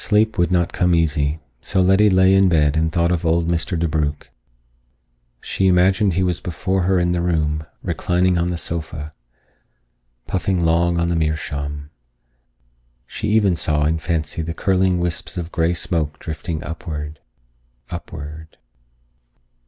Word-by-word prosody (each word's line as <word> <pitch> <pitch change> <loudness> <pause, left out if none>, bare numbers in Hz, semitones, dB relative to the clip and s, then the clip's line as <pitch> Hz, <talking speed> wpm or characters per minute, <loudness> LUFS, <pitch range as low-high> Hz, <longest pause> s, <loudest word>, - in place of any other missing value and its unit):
Sleep 110 +1 +2
would 90 0 +2
not 85 -2 +1
come 90 -1 +2
easy, 75 -2 +1 0.2
so 95 - -1
Letty 95 +3 +5
lay 95 0 +5
in 95 -1 +5
bed 75 -3 +3
and 80 0 +1
thought 85 +1 +1
of 85 -2 0
old 85 0 +1
Mr. 85 0 -1
DeBrugh. 75 -3 0 1.3
She 95 - 0
imagined 95 +1 +3
he 95 - +1
was 90 -2 0
before 95 +1 -1
her 95 +1 +2
in 90 0 +1
the 90 -1 0
room, 75 -3 0 0.2
reclining 90 +1 +1
on 85 +1 +1
the 90 - -2
sofa, 80 -2 -5 1.1
puffing 95 0 -1
long 85 0 +2
on 85 0 +1
the 85 - 0
meerschaum. 75 -2 -3 1.1
She - - -5
even 105 -4 +3
saw 75 -2 +1
in 80 +1 +1
fancy 80 -1 -2
the 85 +1 -4
curling 95 0 +2
wisps 85 +1 -3
of 85 -1 -4
gray 85 0 +1
smoke 80 -3 -1
drifting 80 0 -5
upward, 75 -3 -6 0.7
upward.... 80 -2 -8
85 Hz, 145 wpm, -20 LUFS, 80-90 Hz, 1.3 s, Letty